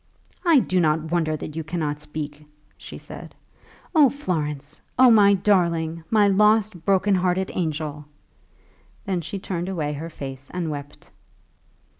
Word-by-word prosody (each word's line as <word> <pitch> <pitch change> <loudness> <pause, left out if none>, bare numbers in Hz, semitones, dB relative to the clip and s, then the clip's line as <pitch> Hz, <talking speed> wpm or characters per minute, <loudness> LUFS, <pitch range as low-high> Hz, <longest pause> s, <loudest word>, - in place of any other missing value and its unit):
"I 335 -4 +5
do 185 -7 +2
not 160 -1 +1
wonder 160 -3 0
that 150 - -7
you 160 - -3
cannot 155 -2 -3
speak," 150 0 -6 0.3
she - - -10
said. - - -11 0.6
"Oh, 300 -5 +6
Florence, 150 - -4 0.2
oh, 255 -1 +7
my 200 -2 +6
darling; 170 -4 +1
my 210 -2 +4
lost, 210 -2 +3
broken 195 +1 +3
hearted 185 0 +1
angel!" 150 -3 -3 1.0
Then 185 -3 -1
she 195 - -5
turned 185 -2 -4
away 155 -6 -2
her 160 +3 -6
face 135 -3 -8
and 170 -3 -2
wept. 145 0 -9
170 Hz, 140 wpm, -23 LUFS, 150-195 Hz, 1.0 s, oh